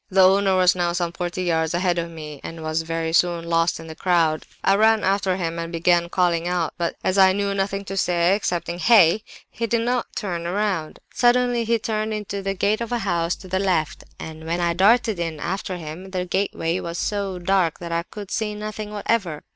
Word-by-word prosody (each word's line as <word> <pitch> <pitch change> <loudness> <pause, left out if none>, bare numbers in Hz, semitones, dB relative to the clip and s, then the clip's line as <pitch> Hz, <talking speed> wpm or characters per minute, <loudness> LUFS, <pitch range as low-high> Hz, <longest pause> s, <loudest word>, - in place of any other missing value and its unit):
"The 190 -1 +6
owner 195 0 +3
was 185 -1 +5
now 175 -1 0
some 175 -1 -1
forty 175 +1 -4
yards 160 -1 0
ahead 175 -1 +1
of 170 0 -3
me, 150 -3 -9
and 165 -1 -7
was 155 +1 -1
very 165 0 -3
soon 170 -1 +2
lost 165 0 +1
in 160 - -9
the 160 - -8
crowd. 165 -2 +1 0.2
I 195 - +4
ran 220 +1 +4
after 195 -1 +1
him, 170 -2 -3
and 165 0 -4
began 170 0 +2
calling 175 -2 +1
out; 175 -3 -1
but 170 -1 -2
as 185 +1 +1
I 190 -1 +7
knew 200 0 -1
nothing 195 0 -2
to 195 - -5
say 175 -1 +2
excepting 175 -4 -2
'hey!' 210 -2 +5 0.3
he 230 - -3
did 230 +1 +1
not 245 +1 0
turn 175 -6 -3
round. 190 -4 -1 0.2
Suddenly 245 -1 +2
he 230 +1 +2
turned 215 0 -2
into 200 -1 -4
the 195 0 -2
gate 205 +4 +1
of 235 - -4
a 240 - +1
house 170 -2 0
to 190 - -13
the 190 +1 -1
left; 175 -6 0 0.2
and 160 0 -8
when 170 +2 -1
I 170 -1 +1
darted 215 +2 +3
in 165 -3 -3
after 185 +2 -3
him, 165 +3 -8
the 185 -1 -3
gateway 180 -2 -1
was 170 -1 -5
so 200 -2 -2
dark 180 -2 +1
that 170 -1 -7
I 170 0 0
could 200 +3 -10
see 210 -1 -2
nothing 215 0 -6
whatever. 200 -7 -1
180 Hz, 215 wpm, -23 LUFS, 170-200 Hz, 0.3 s, I